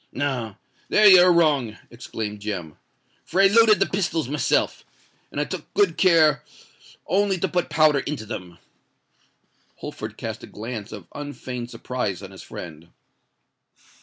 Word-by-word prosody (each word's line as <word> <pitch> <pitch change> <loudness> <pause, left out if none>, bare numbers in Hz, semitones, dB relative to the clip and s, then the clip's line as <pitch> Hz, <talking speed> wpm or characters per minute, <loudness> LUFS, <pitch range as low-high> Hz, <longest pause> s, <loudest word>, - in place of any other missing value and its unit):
"No—there 130 - -1
you 185 -3 +9
are 180 0 +6
wrong," 145 -10 +2
exclaimed 110 -3 -6
Jem; 95 -7 -5 0.5
"for 185 - -2
I 195 - +7
loaded 215 +1 +6
the 195 - +3
pistols 170 -7 -1
myself, 145 +2 0 0.5
and - - -4
I - - +2
took - - -7
good 410 -1 +3
care 160 -7 +4 0.6
only 195 0 +1
to 190 - -1
put 175 0 -1
powder 150 -1 +4
into 140 -4 -5
them." 90 -6 -7 1.2
Holford - - -8
cast - - -5
a - - -10
glance 110 0 -7
of - - -9
unfeigned 130 -4 -6
surprise 105 -7 -4
on 95 - -9
his 95 - -11
friend. 80 -2 -10
145 Hz, 140 wpm, -23 LUFS, 110-180 Hz, 1.2 s, you